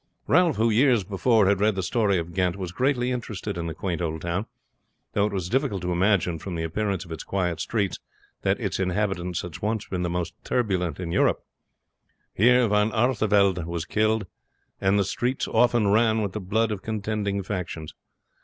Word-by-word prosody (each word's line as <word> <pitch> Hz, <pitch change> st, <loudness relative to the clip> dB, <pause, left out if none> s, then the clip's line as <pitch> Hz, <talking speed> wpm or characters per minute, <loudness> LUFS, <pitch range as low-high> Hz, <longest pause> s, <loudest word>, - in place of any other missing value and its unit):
Ralph, 175 Hz, -5 st, +4 dB
who 115 Hz, +2 st, +2 dB
years 120 Hz, -1 st, +4 dB
before 105 Hz, +3 st, +2 dB
had 100 Hz, 0 st, +3 dB
read 105 Hz, 0 st, +2 dB
the 95 Hz, -, -2 dB
history 105 Hz, -3 st, +2 dB
of 85 Hz, 0 st, -4 dB
Ghent, 90 Hz, -1 st, +1 dB
was 95 Hz, -3 st, -5 dB
greatly 125 Hz, +4 st, +1 dB
interested 110 Hz, -4 st, -4 dB
in 85 Hz, -1 st, -3 dB
the 80 Hz, -, -5 dB
quaint 90 Hz, -3 st, -3 dB
old 80 Hz, -2 st, -2 dB
town; 90 Hz, +5 st, -2 dB, 0.7 s
though 100 Hz, 0 st, +2 dB
it -, -, -5 dB
was 95 Hz, -4 st, -2 dB
difficult 125 Hz, -5 st, 0 dB
to 90 Hz, -, -1 dB
imagine 90 Hz, -2 st, +2 dB
from 95 Hz, 0 st, -6 dB
the 80 Hz, -, -2 dB
appearance 95 Hz, +2 st, -2 dB
of 85 Hz, -, -13 dB
its 80 Hz, -, -5 dB
quiet 90 Hz, -4 st, -1 dB
streets 100 Hz, 0 st, -1 dB, 0.4 s
that -, -, +1 dB
its -, -, -2 dB
inhabitants 90 Hz, -2 st, -1 dB
had 90 Hz, -4 st, -8 dB
once 110 Hz, 0 st, -2 dB
been 90 Hz, -2 st, -3 dB
the 90 Hz, -, -1 dB
most 85 Hz, -1 st, -2 dB
turbulent 90 Hz, -, -1 dB
in 85 Hz, -2 st, -4 dB
Europe. -, -, +2 dB, 0.9 s
Here 125 Hz, +3 st, +4 dB
Von 105 Hz, +1 st, +2 dB
Artevelde 105 Hz, -6 st, +2 dB
was 85 Hz, -1 st, -3 dB
killed, 110 Hz, +2 st, +1 dB, 0.5 s
and 95 Hz, +1 st, +2 dB
the 100 Hz, -, +3 dB
streets 125 Hz, +7 st, -1 dB
often 115 Hz, -2 st, +3 dB
ran 110 Hz, +1 st, +3 dB
with 100 Hz, -, -2 dB
the 105 Hz, -, -5 dB
blood 110 Hz, +4 st, 0 dB
of 100 Hz, -3 st, -3 dB
contending 105 Hz, -2 st, -2 dB
factions. 90 Hz, -5 st, -5 dB
100 Hz, 190 wpm, -25 LUFS, 90-110 Hz, 0.9 s, Ralph